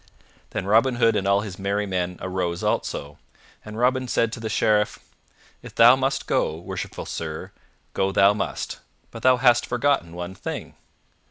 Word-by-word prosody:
Then 95 - -4
Robin 115 +5 +3
Hood 115 -1 +3
and 100 - 0
all 100 0 +3
his 100 -3 -7
merry 100 +2 -1
men 90 -2 -2
arose 90 -2 -2
also, 70 +1 -2 0.4
and 110 0 -9
Robin 130 +2 +1
said 115 -2 +1
to 115 - -6
the 110 -1 -4
Sheriff, 105 -1 +2 0.6
"If - - -12
thou 120 +2 +8
must 135 +1 -1
go, 75 - 0
worshipful 85 - -6
sir, 80 -1 -5 0.4
go 95 0 0
thou 100 +1 +5
must; 105 - -4 0.3
but 115 - -9
thou 130 +1 +5
hast 120 -1 +4
forgotten 125 -9 0
one 90 +1 -5
thing." 100 - -6
105 Hz, 165 wpm, -24 LUFS, 95-120 Hz, 0.6 s, thou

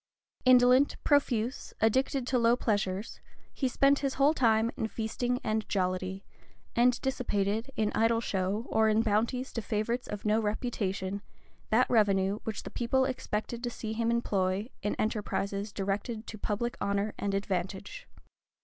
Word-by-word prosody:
Indolent, 255 +2 +6
profuse, 260 -4 +1
addicted 260 +4 +2
to 250 0 +1
low 235 0 +4
pleasures, 205 -3 -2 0.3
he 265 - 0
spent 275 +2 +3
his 275 -2 -1
whole 285 +3 +4
time 230 -4 +3
in 220 - -2
feasting 240 +3 -2
and 215 0 -1
jollity, 185 0 -1 0.5
and 245 +1 +4
dissipated, 225 -3 -1
in 215 -1 +1
idle 225 0 +3
show, 200 0 -1
or 220 0 +3
in 215 +1 +3
bounties 230 +4 0
to 230 - -2
favorites 225 +3 -2
of 210 0 -6
no 215 +1 +3
reputation, 200 -3 -2 0.5
that 240 +4 +4
revenue 200 -3 +2
which 220 - -4
the - - -8
people 260 +2 +1
expected 235 -2 -3
to 240 - -1
see 220 -2 -5
him 230 +1 0
employ 200 -2 0
in 205 - -1
enterprises 205 -2 -2
directed 205 +4 -3
to 215 - -8
public 230 +4 -2
honor 200 +1 0
and 200 -1 -1
advantage. 195 - -3
220 Hz, 150 wpm, -30 LUFS, 200-245 Hz, 0.5 s, Indolent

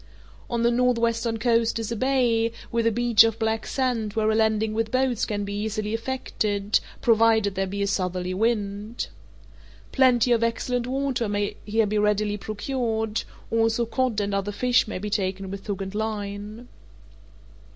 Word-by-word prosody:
On 235 -1 -1
the 235 - +4
northwestern 235 -2 +1
coast 230 0 +2
is 225 0 -4
a - - -1
bay, 235 -2 +2 0.2
with 230 0 +1
a - - +3
beach 235 -1 +5
of 225 -1 0
black 220 0 -1
sand 245 -6 -1
where 220 0 +1
a - - +1
landing 220 -1 +2
with 225 0 -1
boats 255 -1 +1
can 205 -2 -2
be 200 - -5
easily 215 +1 -2
effected, 215 -4 -1 0.2
provided 225 -3 +4
there 195 0 -1
be 200 +1 -2
a - - +1
southerly 185 -2 -1
wind. 210 +1 -1 0.8
Plenty 250 -3 +4
of 230 -1 +3
excellent 240 +1 -1
water 260 -4 -1
may 205 0 -1
here 220 +1 +2
be 210 +1 0
readily 210 0 +1
procured; 220 0 -2 0.3
also 225 +1 +2
cod 230 -1 0
and 205 -1 -1
other 200 +1 -1
fish 250 +3 +2
may 215 - -4
be 205 +3 -5
taken 195 -1 -2
with 195 +1 -8
hook 200 -2 -3
and 190 0 -7
line. 210 +1 -4
220 Hz, 165 wpm, -25 LUFS, 205-235 Hz, 0.8 s, beach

